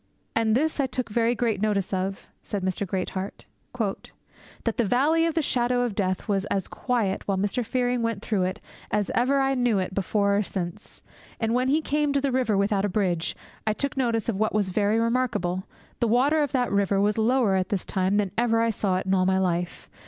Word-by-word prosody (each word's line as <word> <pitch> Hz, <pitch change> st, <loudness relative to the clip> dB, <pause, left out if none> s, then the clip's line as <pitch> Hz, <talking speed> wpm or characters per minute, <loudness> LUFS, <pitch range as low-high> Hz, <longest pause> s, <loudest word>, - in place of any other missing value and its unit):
'And 225 Hz, -1 st, +2 dB
this 310 Hz, +4 st, 0 dB
I 275 Hz, -, +2 dB
took 255 Hz, -2 st, -3 dB
very 230 Hz, +2 st, +1 dB
great 225 Hz, -5 st, 0 dB
notice 205 Hz, -3 st, 0 dB
of,' 190 Hz, +1 st, -2 dB, 0.2 s
said 200 Hz, -2 st, -4 dB
Mr. 190 Hz, +1 st, -1 dB
Greatheart, 190 Hz, +1 st, -4 dB, 0.3 s
'that 210 Hz, -5 st, -3 dB, 0.6 s
the 235 Hz, -, +3 dB
Valley 295 Hz, +9 st, +3 dB
of 330 Hz, -, -2 dB
the 325 Hz, -, +2 dB
Shadow 245 Hz, -1 st, +1 dB
of 240 Hz, -3 st, -1 dB
Death 185 Hz, -2 st, -1 dB
was 200 Hz, -2 st, 0 dB
as 195 Hz, -2 st, -2 dB
quiet 230 Hz, -7 st, -1 dB
while 195 Hz, -1 st, +1 dB
Mr. 205 Hz, +5 st, 0 dB
Fearing 245 Hz, +1 st, 0 dB
went 230 Hz, -3 st, -2 dB
through 210 Hz, -4 st, 0 dB
it 185 Hz, +1 st, -3 dB, 0.3 s
as 210 Hz, -2 st, 0 dB
ever 260 Hz, +4 st, +2 dB
I 270 Hz, 0 st, +2 dB
knew 245 Hz, -5 st, +2 dB
it 185 Hz, -1 st, -2 dB
before 200 Hz, +1 st, +1 dB
or -, -, +3 dB
since; 190 Hz, 0 st, -6 dB, 0.4 s
and 225 Hz, 0 st, 0 dB
when 250 Hz, +1 st, +2 dB
he 295 Hz, +4 st, +3 dB
came 295 Hz, -1 st, +1 dB
to 280 Hz, -, +2 dB
the 275 Hz, -1 st, 0 dB
river 245 Hz, -5 st, +1 dB
without 200 Hz, 0 st, +1 dB
a 205 Hz, -, +1 dB
bridge, 180 Hz, -4 st, 0 dB, 0.3 s
I 215 Hz, -, +3 dB
took 280 Hz, +5 st, -2 dB
notice 235 Hz, -5 st, 0 dB
of 210 Hz, -4 st, -1 dB
what 215 Hz, 0 st, +1 dB
was 205 Hz, -3 st, +1 dB
very 205 Hz, +3 st, +1 dB
remarkable; 230 Hz, -7 st, 0 dB, 0.3 s
the 235 Hz, -, +2 dB
water 270 Hz, +7 st, +3 dB
of 290 Hz, -2 st, 0 dB
that 250 Hz, -3 st, 0 dB
river 200 Hz, -1 st, +2 dB
was 210 Hz, +2 st, +2 dB
lower 235 Hz, -2 st, +3 dB
at 185 Hz, 0 st, 0 dB
this 200 Hz, -3 st, -2 dB
time 190 Hz, +1 st, 0 dB
than 200 Hz, -3 st, 0 dB
ever 230 Hz, -1 st, +2 dB
I 230 Hz, 0 st, +2 dB
saw 195 Hz, -3 st, 0 dB
it 185 Hz, -, -3 dB
in 190 Hz, -, +1 dB
all 185 Hz, -1 st, +3 dB
my 190 Hz, 0 st, +3 dB
life. 175 Hz, -2 st, -1 dB
215 Hz, 220 wpm, -25 LUFS, 195-245 Hz, 0.6 s, the